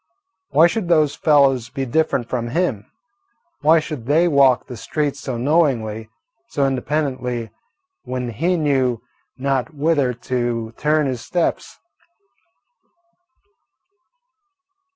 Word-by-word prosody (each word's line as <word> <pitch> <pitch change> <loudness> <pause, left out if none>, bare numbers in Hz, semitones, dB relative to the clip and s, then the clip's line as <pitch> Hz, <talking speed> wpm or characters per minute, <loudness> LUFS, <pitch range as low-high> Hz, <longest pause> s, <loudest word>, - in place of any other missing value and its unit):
Why 165 - +5
should 180 +2 0
those 155 -4 +3
fellows 135 -6 +3
be 135 0 -4
different 130 -2 0
from 120 -1 -3
him? 125 - -1 0.7
Why 160 +2 +5
should 150 -6 -7
they 160 +5 +3
walk 135 -5 +4
the 125 - -8
streets 145 +3 -2
so 130 -3 -4
knowingly, 120 -6 0 0.4
so 140 -10 0
independently, 130 -4 -2 0.5
when 125 -1 -4
he 170 - 0
knew 130 -6 0 0.3
not 135 +2 -1
whither 145 -3 +1
to 120 -2 -3
turn 150 0 +1
his 130 -3 -3
steps? 175 -2 -2
135 Hz, 110 wpm, -20 LUFS, 120-155 Hz, 0.7 s, Why